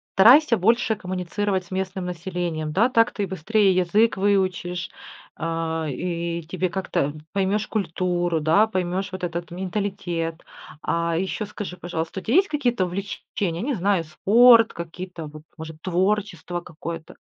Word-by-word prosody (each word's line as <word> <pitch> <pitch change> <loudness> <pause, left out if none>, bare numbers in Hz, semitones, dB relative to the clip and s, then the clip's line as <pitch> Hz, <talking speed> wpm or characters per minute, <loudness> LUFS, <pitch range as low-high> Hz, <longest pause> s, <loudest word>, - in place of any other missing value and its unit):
старайся 245 +5 +7
больше 225 +3 +2
коммуницировать 185 0 -2
с - - -21
местным 190 0 -3
населением, 175 -3 -3
да? 215 +10 +3
Так 230 -1 +3
ты 205 -3 -3
быстрее 190 +2 +2
язык 205 +5 +3
выучишь, 185 -3 0 0.5
а, 165 0 -2
и 170 +3 -3
тебе 180 +3 -2
как-то 170 -5 -1 0.2
поймешь 200 +2 0
культуру, 175 -3 -1
да, 165 +8 +4
поймешь 190 -1 -2
вот 185 0 -7
этот 170 0 -4
менталитет. 180 -3 -3 0.4
А 170 0 0
еще 190 +5 -2
скажи, 205 -3 -7
пожалуйста, 175 +1 -4
у - - -19
тя 230 - -1
есть 385 +5 +5
какие-то 245 - 0
увлечения, 180 -1 -4
не 270 +3 -1
знаю, 190 -2 +1
спорт 230 +8 +6
какие-то, 170 -1 -7
вот, 155 0 -11
может, 160 -1 -8
творчество 185 -1 -1
какое-то? 165 -1 -8
185 Hz, 140 wpm, -24 LUFS, 170-205 Hz, 0.5 s, старайся